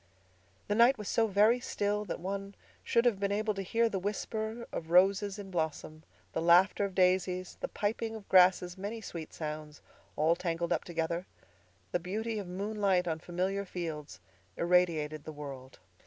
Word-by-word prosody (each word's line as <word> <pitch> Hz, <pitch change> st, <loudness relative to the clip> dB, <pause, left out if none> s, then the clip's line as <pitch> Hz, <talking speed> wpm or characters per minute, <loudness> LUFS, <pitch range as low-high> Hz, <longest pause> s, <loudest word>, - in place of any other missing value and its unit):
The -, -, +1 dB
night 235 Hz, +5 st, +5 dB
was 210 Hz, -2 st, -7 dB
so 225 Hz, -1 st, +2 dB
very 215 Hz, +4 st, +4 dB
still 210 Hz, -3 st, -1 dB
that 180 Hz, -, -4 dB
one 195 Hz, +2 st, -5 dB, 0.3 s
should 235 Hz, +1 st, +2 dB
have 225 Hz, -5 st, +3 dB
been 200 Hz, 0 st, 0 dB
able 215 Hz, +1 st, 0 dB
to 195 Hz, -, -4 dB
hear 230 Hz, +5 st, +2 dB
the 200 Hz, -4 st, -2 dB
whisper 220 Hz, +3 st, -3 dB
of 160 Hz, -, -5 dB
roses 195 Hz, +3 st, +4 dB
in 195 Hz, -2 st, -8 dB
blossom—the 160 Hz, -1 st, -4 dB
laughter 180 Hz, +4 st, +5 dB
of 195 Hz, -2 st, -6 dB
daisies—the 185 Hz, 0 st, +1 dB
piping 225 Hz, +2 st, -2 dB
of 215 Hz, -2 st, -10 dB
grasses—many 185 Hz, +3 st, +3 dB
sweet 170 Hz, -6 st, -7 dB
sounds, 150 Hz, -1 st, -6 dB, 0.3 s
all 160 Hz, +3 st, +3 dB
tangled 170 Hz, 0 st, -1 dB
up 165 Hz, -, -1 dB
together. 170 Hz, +1 st, -2 dB, 0.6 s
The 175 Hz, -, +1 dB
beauty 215 Hz, +5 st, -3 dB
of 200 Hz, -, -6 dB
moonlight 195 Hz, -1 st, 0 dB
on 160 Hz, -1 st, -1 dB
familiar 185 Hz, +4 st, -2 dB
fields 165 Hz, -, -6 dB, 0.4 s
irradiated 165 Hz, -4 st, +2 dB
the 155 Hz, -, -7 dB
world. 135 Hz, -3 st, -9 dB
185 Hz, 155 wpm, -31 LUFS, 170-205 Hz, 0.6 s, night